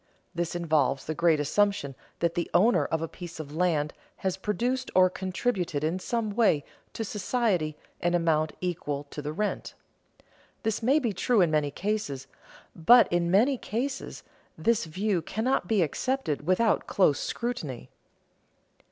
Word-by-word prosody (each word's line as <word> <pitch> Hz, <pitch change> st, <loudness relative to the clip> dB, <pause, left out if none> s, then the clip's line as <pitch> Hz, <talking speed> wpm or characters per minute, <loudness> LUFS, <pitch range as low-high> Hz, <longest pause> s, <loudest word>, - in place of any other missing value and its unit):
This 170 Hz, -1 st, -2 dB
involves 155 Hz, -5 st, +1 dB
the 155 Hz, -, -2 dB
great 165 Hz, -1 st, +3 dB
assumption 155 Hz, -1 st, +1 dB, 0.3 s
that 170 Hz, 0 st, +2 dB
the 170 Hz, -, -2 dB
owner 180 Hz, -4 st, +4 dB
of 160 Hz, 0 st, -1 dB
a -, -, -2 dB
piece 175 Hz, -1 st, -9 dB
of 150 Hz, -1 st, -7 dB
land 160 Hz, -4 st, +1 dB, 0.2 s
has 190 Hz, -1 st, -2 dB
produced 240 Hz, +7 st, -1 dB
or 185 Hz, 0 st, +6 dB
contributed 185 Hz, -5 st, -2 dB
in 165 Hz, +4 st, 0 dB
some 225 Hz, +2 st, -2 dB
way 200 Hz, -10 st, +2 dB, 0.3 s
to 225 Hz, -, -3 dB
society 200 Hz, -7 st, -1 dB, 0.2 s
an 175 Hz, 0 st, +1 dB
amount 160 Hz, -2 st, +1 dB
equal 150 Hz, -5 st, -2 dB
to 150 Hz, -, -5 dB
the 145 Hz, +1 st, -4 dB
rent. 210 Hz, +7 st, -3 dB, 0.9 s
This 220 Hz, 0 st, -1 dB
may 260 Hz, +6 st, +4 dB
be 240 Hz, -8 st, 0 dB
true 225 Hz, +5 st, +2 dB
in 170 Hz, -3 st, +3 dB
many 150 Hz, -2 st, +2 dB
cases, 195 Hz, -6 st, -3 dB, 0.5 s
but 235 Hz, +9 st, +7 dB
in 175 Hz, -1 st, +2 dB
many 235 Hz, +8 st, +3 dB
cases 265 Hz, +5 st, -4 dB, 0.3 s
this 230 Hz, -3 st, +1 dB
view 185 Hz, +3 st, -1 dB
cannot 220 Hz, +1 st, -1 dB
be 205 Hz, -4 st, +3 dB
accepted 160 Hz, -, -2 dB
without 210 Hz, +4 st, +2 dB
close 155 Hz, -8 st, +3 dB
scrutiny. 165 Hz, -, -4 dB
180 Hz, 150 wpm, -28 LUFS, 155-220 Hz, 0.9 s, but